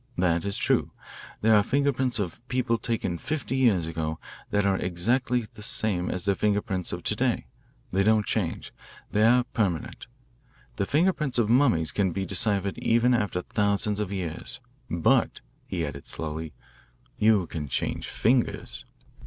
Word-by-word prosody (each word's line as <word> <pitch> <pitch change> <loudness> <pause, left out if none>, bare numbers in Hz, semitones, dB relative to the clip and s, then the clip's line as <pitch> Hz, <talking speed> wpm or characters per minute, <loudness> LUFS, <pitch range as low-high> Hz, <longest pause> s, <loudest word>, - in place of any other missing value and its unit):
That 85 -1 +1
is 100 -1 -2
true. - - +1 0.5
There 110 0 +5
are 105 - +6
fingerprints 130 +1 +1
of 100 -1 -3
people 125 -2 0
taken 100 -8 -2
fifty 150 -4 -3
years 115 -11 +3
ago 80 -1 -3 0.3
that 105 0 +1
are 100 -1 +3
exactly 120 +7 0
the - - -12
same 100 -4 +2
as 90 0 -3
their 100 - +3
finger 105 +1 +1
prints 95 -3 -3
of - - -5
to - - 0
day. - - 0 0.5
They 95 - +2
don't 110 +1 +3
change 90 -7 -2 0.4
they 105 - +2
are 125 +2 +5
permanent. 100 -9 -2 0.7
The 100 - -1
fingerprints 150 -4 +1
of 115 -2 +2
mummies 120 - +3
can 95 -4 0
be 95 +2 -2
deciphered 100 0 +1
even 120 +2 +3
after 105 -6 0
thousands 105 0 +1
of 105 -2 -2
years. 90 -5 -5 0.3
But," - - +2 0.3
he 85 -3 -2
added 70 -1 -7
slowly, 80 -1 -5 0.6
"you 105 -4 +4
can 75 -2 -5
change - - -2
fingers." 115 - 0
100 Hz, 155 wpm, -26 LUFS, 90-120 Hz, 0.7 s, are